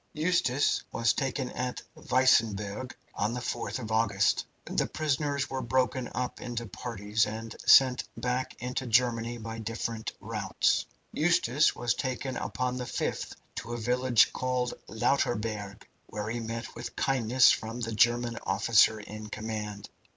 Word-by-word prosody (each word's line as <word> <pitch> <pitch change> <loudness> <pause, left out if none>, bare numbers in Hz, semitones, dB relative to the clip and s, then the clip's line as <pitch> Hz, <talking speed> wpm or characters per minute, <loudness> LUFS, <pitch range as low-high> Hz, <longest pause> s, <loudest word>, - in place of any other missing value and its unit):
"Eustace 150 -4 +2
was 115 -1 +2
taken 135 -1 -2
at 125 0 -3 0.2
Weissenburg 115 -2 +2 0.2
on 105 +4 -1
the - - -2
4th 125 - -3
of 110 -4 -6
August. 110 -1 +2 0.2
The - - 0
prisoners 145 -2 -1
were 135 -1 -3
broken 130 0 0
up 125 -1 -3
into 120 -1 -4
parties, 110 -1 -1
and 110 +1 -6
sent 130 -2 +7
back 125 +1 -2
into 125 +1 -3
Germany 120 0 +2
by 115 0 -6
different 115 0 -3
routes. 105 -6 0 0.3
Eustace 155 -4 +3
was 120 -1 0
taken 130 0 -3
upon 125 0 -2
the 125 - -3
5th - - -3 0.2
to 115 +2 -5
a - - -2
village 125 +1 +3
called 125 -1 -1 0.2
Lauterburg, 105 -4 -1 0.2
where 105 +1 -4
he 120 - -2
met 115 0 -5
with - - -7
kindness 130 -1 +4
from 115 +2 -3
the 115 -1 -2
German 120 +1 +2
officer 110 -1 +4
in 105 +1 -8
command. 105 -2 -5
120 Hz, 140 wpm, -29 LUFS, 110-130 Hz, 0.3 s, sent